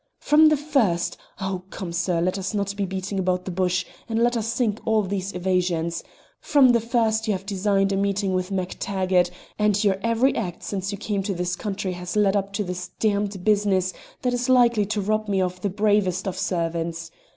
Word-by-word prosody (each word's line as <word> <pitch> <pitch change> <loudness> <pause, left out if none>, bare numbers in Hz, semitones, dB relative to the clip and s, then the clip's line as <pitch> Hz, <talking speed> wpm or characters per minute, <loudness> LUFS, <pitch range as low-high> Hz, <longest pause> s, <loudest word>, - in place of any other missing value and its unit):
"From 310 +1 +5
the 305 - +3
first 255 - +1 0.2
oh, 190 -2 -3
come! 180 -3 -6
sir, 170 0 0
let 185 +3 0
us 195 +3 -3
not 200 -1 -1
be 200 -1 -1
beating 190 +1 -3
about 180 -1 0
the 185 - -4
bush, 185 0 0 0.2
and 225 - -1
let 240 +1 +3
us 225 -1 -1
sink 225 -2 0
all 220 -1 +2
these 195 0 -3
evasions 175 -2 0 0.4
from 280 -4 +5
the 240 -1 +5
first 225 -1 +1
you 215 - +2
have 190 0 -5
designed 195 0 +1
a - - +1
meeting 195 0 0
with 185 0 -1
MacTaggart, 185 -1 0 0.3
and 210 0 +2
your 195 -2 +2
every 230 +4 +2
act 180 -6 -4
since 195 0 -3
you 200 - -4
came 205 -1 -2
to 195 0 -2
this 175 0 -1
country 195 -1 -3
has 180 +1 -6
led 205 -1 +3
up 200 0 -1
to 205 - -1
this 180 -1 -5
damned 205 -3 0
business 200 -3 +2 0.3
that 250 -1 +1
is 245 +1 -1
likely 240 -5 +4
to 215 0 -1
rob 215 +2 0
me 195 -2 +1
of 180 -1 -1
the 200 - 0
bravest 200 -2 +1
of 190 - -2
servants. 165 -1 -2
195 Hz, 205 wpm, -24 LUFS, 185-215 Hz, 0.4 s, From